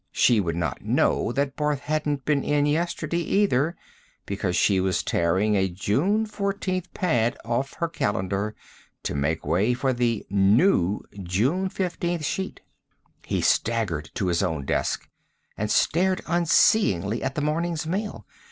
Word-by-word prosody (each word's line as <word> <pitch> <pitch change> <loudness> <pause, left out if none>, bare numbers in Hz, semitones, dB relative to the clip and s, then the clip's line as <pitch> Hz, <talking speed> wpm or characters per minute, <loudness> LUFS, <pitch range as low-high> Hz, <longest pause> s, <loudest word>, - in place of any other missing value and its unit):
She 120 -3 +4
would 85 -4 -1
not 85 -6 -2
know - - +1
that 140 0 -1
Barth 150 -2 -1
hadn't 150 -2 -2
been 145 -2 +1
in 145 0 +2
yesterday, 165 +1 -1
either, 170 -4 +1 0.5
because 95 -2 -2
she 100 -2 +3
was 95 -2 0
tearing 95 +6 +1
a 95 -1 +2
June 145 - +1
14th 200 -3 -3
pad 120 -10 +1
off 120 +4 -1
her 170 - -1
calendar 100 - -2 0.5
to - - -2
make 75 +3 -1
way 95 +11 +2
for 130 +1 0
the 120 -3 0
"new" 100 - +3 0.2
June 125 - 0
15th 175 -3 -2
sheet. 190 +6 -3 0.7
He - - 0
staggered 105 -10 0
to 100 - -1
his 85 -1 +1
own 80 -7 -2
desk - - -1 0.5
and 105 0 -2
stared 185 - +2
unseeingly 160 - +3
at 135 - -3
the 150 - -1
morning's 160 +2 -1
mail. 200 +6 -3
130 Hz, 145 wpm, -25 LUFS, -, 0.7 s, She